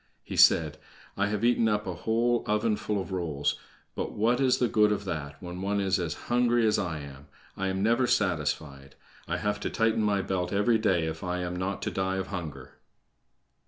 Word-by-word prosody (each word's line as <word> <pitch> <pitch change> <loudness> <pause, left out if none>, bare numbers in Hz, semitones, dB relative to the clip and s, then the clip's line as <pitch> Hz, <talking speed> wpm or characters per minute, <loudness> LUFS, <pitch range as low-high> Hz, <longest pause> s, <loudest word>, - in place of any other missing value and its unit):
He - - -7
said: 80 -2 +5 0.4
"I 100 0 +1
have 105 +2 -1
eaten 120 -1 +3
up 105 0 0
a - - -3
whole 120 +1 +1
oven 105 +1 +1
full 105 -1 -2
of 95 - -6
rolls, 75 -6 -1 0.3
but - - -4
what 120 +5 +1
is 130 -1 +3
the 125 - +2
good 105 -1 +3
of 100 -1 -2
that 70 -5 -5
when 90 0 -6
any 95 - -6
one 100 +1 0
is 95 -1 +1
as 80 -4 -2
hungry 120 -1 +2
as 105 -1 +2
I 85 -5 -2
am. 70 0 -11 0.3
I 95 - -2
am 95 +1 -1
never 120 +3 +3
satisfied. 75 - -1 0.3
I - - -1
have 105 0 -1
to - - -3
tighten 115 -1 +1
my 100 -2 +1
belt 90 -2 -2
every 110 +3 +2
day 95 -6 +2
if 80 0 -5
I 90 0 -2
am 90 0 -3
not 95 +2 -3
to - - -2
die 95 0 -1
of 95 0 -3
hunger." 75 -9 -7
95 Hz, 210 wpm, -28 LUFS, 85-110 Hz, 0.4 s, said